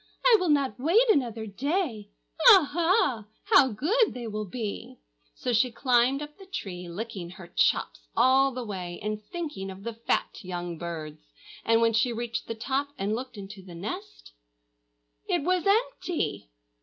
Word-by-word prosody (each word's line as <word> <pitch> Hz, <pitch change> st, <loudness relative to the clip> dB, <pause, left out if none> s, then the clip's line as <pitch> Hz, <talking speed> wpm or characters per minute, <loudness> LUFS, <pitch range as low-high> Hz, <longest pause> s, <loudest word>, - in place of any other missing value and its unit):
I -, -, +8 dB
will 365 Hz, -, 0 dB
not 275 Hz, -6 st, +1 dB
wait 370 Hz, -, +4 dB
another 235 Hz, -, 0 dB
day. 250 Hz, -, -2 dB, 0.4 s
Aha! 330 Hz, -, +4 dB, 0.2 s
how 375 Hz, -11 st, +6 dB
good 385 Hz, -, +1 dB
they 245 Hz, -1 st, -5 dB
will 215 Hz, -1 st, -4 dB
be!" 235 Hz, +3 st, -5 dB, 0.4 s
So 250 Hz, -2 st, -2 dB
she 240 Hz, +2 st, +3 dB
climbed 255 Hz, +3 st, +2 dB
up 295 Hz, +4 st, -11 dB
the 390 Hz, -, -13 dB
tree, 180 Hz, -, -6 dB
licking 190 Hz, -1 st, -6 dB
her 185 Hz, 0 st, -11 dB
chops -, -, +2 dB, 0.2 s
all 265 Hz, +3 st, +5 dB
the 255 Hz, -1 st, -5 dB
way 180 Hz, -4 st, -5 dB
and 215 Hz, 0 st, -3 dB
thinking 300 Hz, -, -5 dB
of 190 Hz, +1 st, -9 dB
the 235 Hz, -, -4 dB
fat 230 Hz, +1 st, -1 dB
young 175 Hz, -2 st, -5 dB
birds. 160 Hz, -3 st, -6 dB, 0.4 s
And 230 Hz, 0 st, +3 dB
when 230 Hz, 0 st, +3 dB
she 225 Hz, +3 st, +2 dB
reached 235 Hz, 0 st, -4 dB
the 230 Hz, -, -4 dB
top 270 Hz, +5 st, -1 dB
and 200 Hz, 0 st, -1 dB
looked 255 Hz, +1 st, -5 dB
into 200 Hz, 0 st, -9 dB
the 180 Hz, -2 st, -12 dB
nest, 360 Hz, -, -7 dB, 1.0 s
it -, -, 0 dB
was 365 Hz, +3 st, +1 dB
empty!! 395 Hz, -, 0 dB
235 Hz, 160 wpm, -27 LUFS, 205-295 Hz, 1.0 s, I